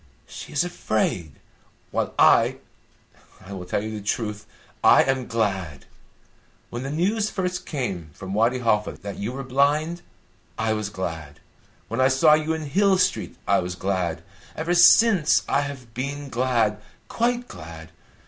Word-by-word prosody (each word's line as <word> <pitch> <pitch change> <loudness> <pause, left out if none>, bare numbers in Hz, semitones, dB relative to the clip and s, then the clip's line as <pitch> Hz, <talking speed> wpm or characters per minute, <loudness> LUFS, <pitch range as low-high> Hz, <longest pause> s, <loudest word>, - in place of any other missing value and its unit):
She - - -10
is 150 - +1
afraid. 110 - -2 0.6
While - - -2
I - - +5 0.9
I 100 - -8
will 90 -2 -7
tell 100 - -1
you 110 - -4
the - - -11
truth 105 0 -3 0.4
I - - +7
am 130 -2 -1
glad. 95 - -2 0.9
When 120 - -4
the 135 - -4
news 205 +8 0
first 180 -2 -3
came 100 - -4
from 95 +4 -7
Wadi 115 +5 +2
Halfa 110 -4 +1
that 100 -1 -6
you 105 +4 -3
were 135 +2 -6
blind, 145 +6 +1 0.6
I 110 0 0
was 105 -1 -3
glad; 80 -7 -6 0.5
when 115 +3 -2
I 130 - +5
saw 135 +4 +5
you 155 +1 +1
in 160 -1 -4
Hill 195 +6 +3
Street, - - 0
I - - +4
was 90 0 -4
glad; 90 -4 -2 0.3
ever 165 +3 -1
since, 175 -1 +6
I 140 - +2
have 135 -5 -7
been 140 +3 -4
glad 115 -4 0 0.3
quite 245 +1 -1
glad. 80 0 -10
125 Hz, 155 wpm, -24 LUFS, 100-155 Hz, 0.9 s, I